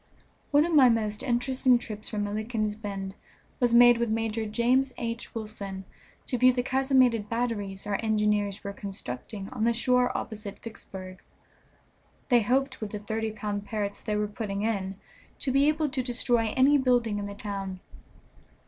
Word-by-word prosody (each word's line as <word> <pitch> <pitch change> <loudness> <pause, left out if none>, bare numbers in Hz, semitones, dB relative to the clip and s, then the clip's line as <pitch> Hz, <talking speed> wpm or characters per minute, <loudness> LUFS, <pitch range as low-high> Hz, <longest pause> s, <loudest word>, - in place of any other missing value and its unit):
One 290 +1 +4
of 340 - -2
my 270 -5 +7
most 215 -2 0
interesting 255 0 +2
trips 215 -3 -7
from 210 -2 -2
Milliken's 215 +1 -2
Bend 195 -3 -5 0.5
was 240 -1 +3
made 240 0 +7
with 235 -1 0
Major 225 0 -1
James 245 +4 +2
H. 230 0 -4
Wilson 200 -3 -5 0.4
to 250 - -2
view 255 +1 +7
the 245 0 -1
casemated 260 -5 +2
batteries 220 -5 -2
our 205 -1 -1
engineers 210 -2 +1
were 200 -1 -5
constructing 195 - -6
on 250 -4 -3
the 235 +1 +3
shore 250 +1 +2
opposite 210 -2 -6
Vicksburg. 190 -4 -9 1.1
They 240 -2 +5
hoped 260 +4 0
with 215 - -3
the 210 - -5
thirty 220 +2 -2
pound 205 -1 -4
Parrotts 205 -2 -3
they 210 - -2
were 210 0 0
putting 205 -1 -4
in 195 -3 -1 0.4
to 265 - 0
be 275 +2 +4
able 305 0 +2
to 265 -1 -1
destroy 240 -2 +1
any 280 +3 +5
building 240 -5 +2
in 200 - -4
the 200 - -7
town. 195 -2 -4
220 Hz, 165 wpm, -28 LUFS, 205-245 Hz, 1.1 s, my